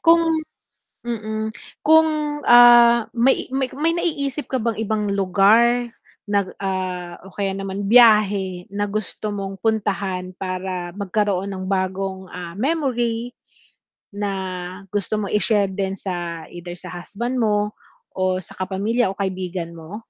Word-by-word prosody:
Kung 330 Hz, -1 st, +4 dB, 0.6 s
mm, 220 Hz, -2 st, -3 dB, 0.3 s
kung, 305 Hz, -1 st, +3 dB
ah, 240 Hz, -1 st, +8 dB
may 245 Hz, +3 st, +2 dB
may 265 Hz, -1 st, 0 dB
may 320 Hz, +3 st, +1 dB
naiisip 295 Hz, -5 st, -2 dB
ka 260 Hz, -, -1 dB
bang 225 Hz, -2 st, -1 dB
ibang 210 Hz, -2 st, -1 dB
lugar 220 Hz, +5 st, +3 dB, 0.3 s
na, 200 Hz, -2 st, 0 dB
ah, 185 Hz, -2 st, -4 dB
o -, -, -18 dB
kaya 195 Hz, -1 st, -1 dB
naman 195 Hz, +1 st, -4 dB
biyahe 205 Hz, -5 st, +5 dB
na 205 Hz, 0 st, -1 dB
gusto 215 Hz, +1 st, -4 dB
mong 195 Hz, -1 st, -5 dB
puntahan 195 Hz, -4 st, -1 dB
para 185 Hz, -1 st, -4 dB
magkaroon 200 Hz, -1 st, -1 dB
ng 185 Hz, 0 st, -5 dB
bagong, 190 Hz, 0 st, -2 dB
ah, 175 Hz, 0 st, -7 dB
memory 245 Hz, -4 st, -1 dB, 0.8 s
na 205 Hz, -1 st, -2 dB, 0.6 s
gusto 205 Hz, +2 st, -1 dB
mo 205 Hz, -, -2 dB
i-share 210 Hz, -1 st, +2 dB
din 195 Hz, 0 st, -3 dB
sa 175 Hz, -3 st, -4 dB
either 175 Hz, 0 st, -9 dB
sa 180 Hz, -, -10 dB
husband 205 Hz, +8 st, -5 dB
mo 210 Hz, -3 st, +1 dB, 0.4 s
o 185 Hz, -1 st, 0 dB
sa 185 Hz, -, -11 dB
kapamilya 195 Hz, +4 st, 0 dB
o 195 Hz, -, -11 dB
kaibigan 185 Hz, -3 st, -3 dB
mo? 165 Hz, +6 st, -8 dB
205 Hz, 130 wpm, -22 LUFS, 190-235 Hz, 0.8 s, ah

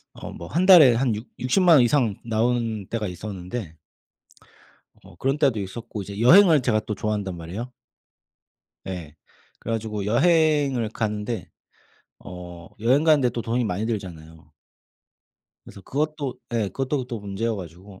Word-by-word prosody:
어 -, -, -8 dB
뭐 85 Hz, -, -9 dB
1 180 Hz, +4 st, 0 dB
달에 155 Hz, -11 st, +8 dB
한 120 Hz, -2 st, +1 dB
육 110 Hz, -, -8 dB
육십만원 155 Hz, +2 st, +4 dB
이상 120 Hz, -5 st, +1 dB
나오는 115 Hz, -2 st, -1 dB
때가 110 Hz, -2 st, -3 dB
있었는데 90 Hz, -1 st, -7 dB, 1.3 s
어 -, -, -16 dB
그런 135 Hz, +3 st, -1 dB
때도 135 Hz, -8 st, +2 dB
있었고 105 Hz, +2 st, -6 dB
이제 100 Hz, +2 st, -8 dB
여행을 165 Hz, +2 st, +6 dB
제가 110 Hz, -3 st, +1 dB
또 105 Hz, 0 st, -5 dB
좋아한단 100 Hz, -2 st, -3 dB
말이에요. 95 Hz, +10 st, -7 dB, 1.1 s
네. 90 Hz, -6 st, -7 dB, 0.4 s
그래 115 Hz, -, -5 dB
가지고 110 Hz, -2 st, -3 dB
여행을 145 Hz, -2 st, +2 dB
가는데 105 Hz, +1 st, -3 dB, 0.7 s
어 90 Hz, -2 st, -10 dB
여행 130 Hz, +7 st, +3 dB
가는 155 Hz, -3 st, +5 dB
데 125 Hz, -2 st, +2 dB
또 115 Hz, -1 st, -4 dB
돈이 120 Hz, +2 st, -1 dB
많이 105 Hz, +1 st, -2 dB
들잖아요. 80 Hz, -7 st, -7 dB, 1.2 s
그래서 100 Hz, -, -12 dB
그것도 145 Hz, -, -3 dB, 0.2 s
예 110 Hz, -4 st, 0 dB
그것도 135 Hz, +5 st, -3 dB
또 115 Hz, -, -4 dB
문제여 105 Hz, +2 st, -3 dB
가지고 95 Hz, +2 st, -11 dB
115 Hz, 295 characters per minute, -24 LUFS, 100-130 Hz, 1.3 s, 달에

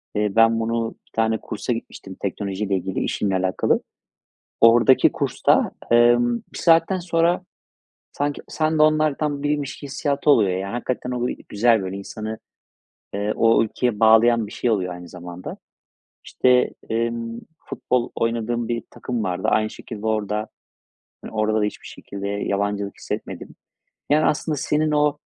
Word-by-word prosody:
eee, 105 Hz, -1 st, 0 dB
ben 115 Hz, 0 st, +5 dB
bunu 115 Hz, 0 st, -1 dB, 0.2 s
bir -, -, -30 dB
tane 110 Hz, 0 st, +1 dB
kursa 115 Hz, +4 st, -4 dB
gitmiştim 95 Hz, -4 st, -8 dB
teknolojiyle 100 Hz, 0 st, -2 dB
ilgili, 95 Hz, 0 st, -2 dB
işimle 100 Hz, -2 st, -1 dB
alakalı. 95 Hz, 0 st, +1 dB, 0.8 s
Oradaki 115 Hz, +2 st, +6 dB
kursta, -, -, +1 dB, 0.2 s
emm, 120 Hz, 0 st, +4 dB, 0.2 s
bir -, -, -7 dB
saatten 165 Hz, +3 st, +3 dB
sonra 170 Hz, 0 st, +1 dB, 0.7 s
sanki 145 Hz, 0 st, -2 dB
sen 155 Hz, 0 st, 0 dB
de -, -, +6 dB
onlardan 155 Hz, -1 st, +1 dB
biriymiş 145 Hz, -1 st, -2 dB
hissiyatı 140 Hz, +1 st, -1 dB
oluyor, 110 Hz, -9 st, +5 dB
yani. 100 Hz, +1 st, -4 dB
Hakikaten 125 Hz, +1 st, -3 dB
o 125 Hz, 0 st, -1 dB
bir -, -, -6 dB
güzel, 115 Hz, 0 st, +3 dB
böyle, 95 Hz, +1 st, -4 dB
insanı, 110 Hz, +2 st, -6 dB, 0.8 s
eee, 105 Hz, +1 st, -1 dB
o 115 Hz, 0 st, +4 dB
ülkeye 110 Hz, 0 st, -2 dB
bağlayan 115 Hz, 0 st, +5 dB
bir 105 Hz, -, -11 dB
şey 120 Hz, -, -1 dB
oluyor 90 Hz, -4 st, 0 dB
aynı 90 Hz, 0 st, -10 dB
zamanda. 90 Hz, 0 st, -8 dB, 0.7 s
İşte, 125 Hz, -1 st, +3 dB, 0.2 s
emm, 115 Hz, 0 st, -2 dB, 0.2 s
futbol 125 Hz, -6 st, -2 dB
oynadığım 115 Hz, 0 st, -1 dB
bir 120 Hz, -1 st, -2 dB
takım 120 Hz, -3 st, -4 dB
vardı. 90 Hz, -1 st, -2 dB
Aynı 110 Hz, 0 st, +2 dB
şekilde 110 Hz, -1 st, -9 dB
orada, 105 Hz, 0 st, -1 dB, 0.8 s
eee, -, -, -7 dB
orada 110 Hz, 0 st, +1 dB
da -, -, +1 dB
hiçbir 105 Hz, -, -6 dB
şekilde 100 Hz, 0 st, -7 dB
yabancılık 100 Hz, 0 st, -2 dB
hissetmedim. -, -, -6 dB, 0.5 s
Yani, 155 Hz, +1 st, +4 dB
aslında 150 Hz, 0 st, 0 dB
senin 155 Hz, +3 st, 0 dB
o 150 Hz, 0 st, +2 dB
115 Hz, 145 wpm, -22 LUFS, 105-130 Hz, 0.8 s, Oradaki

